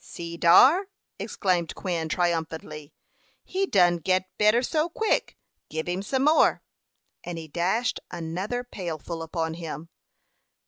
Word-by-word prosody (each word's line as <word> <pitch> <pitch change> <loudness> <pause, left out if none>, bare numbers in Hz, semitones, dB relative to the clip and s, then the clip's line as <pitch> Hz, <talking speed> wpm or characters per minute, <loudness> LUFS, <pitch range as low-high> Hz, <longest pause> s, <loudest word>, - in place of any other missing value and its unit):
"See 170 0 -7
dar!" 265 - +6 0.3
exclaimed 180 -4 -1
Quin, 170 -4 -3
triumphantly. 160 -3 -2 0.5
"He 385 +1 -1
done 175 - +4
git 185 +3 +1 0.2
better 215 +4 +4
so 310 +5 0
quick. 440 +5 -1 0.3
Gib 160 +1 -4
him 180 +2 -1
some 260 +6 -1
more;" 305 +2 +4 0.6
and 175 -1 -5
he 160 -1 -7
dashed 185 +10 0
another 180 +8 -4
pailful 170 - -6
upon 160 0 -3
him. 165 -1 -7
175 Hz, 125 wpm, -26 LUFS, 165-215 Hz, 0.6 s, dar